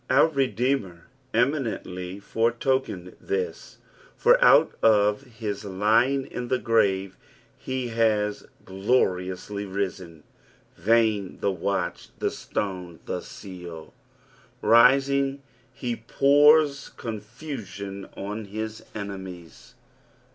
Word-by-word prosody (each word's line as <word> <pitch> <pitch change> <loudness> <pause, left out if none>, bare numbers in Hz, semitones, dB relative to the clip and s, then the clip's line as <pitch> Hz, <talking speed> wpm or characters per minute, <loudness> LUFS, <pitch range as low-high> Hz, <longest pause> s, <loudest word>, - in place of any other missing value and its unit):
Our 140 +5 +5
Redeemer 125 - -1 0.3
eminently 110 -8 -1
foretokened 115 -4 -1
this, 450 +3 -4 0.4
for - - +5
out - - +6
of 105 0 +4
his 110 -5 -6
lying 110 +8 +2
in 125 - -6
the 130 - +1
grave 100 -5 +1 0.4
he 130 -2 -4
has 110 -2 0 0.2
gloriously 95 -1 -1
risen. 95 -4 -4 0.5
Vain 110 -3 +2
the 100 - +1
watch, 95 0 -2
the - - -1
stone, 90 -4 -4
the 90 - -3
seal 90 -5 -10
I - - -21
Rising 135 +3 +4 0.3
he 125 -3 -4
pours 145 +3 +4
confusion 105 -4 -7
on 105 +2 -5
his 110 +2 -6
enemies. 95 -4 -8
110 Hz, 95 wpm, -25 LUFS, 95-130 Hz, 0.5 s, out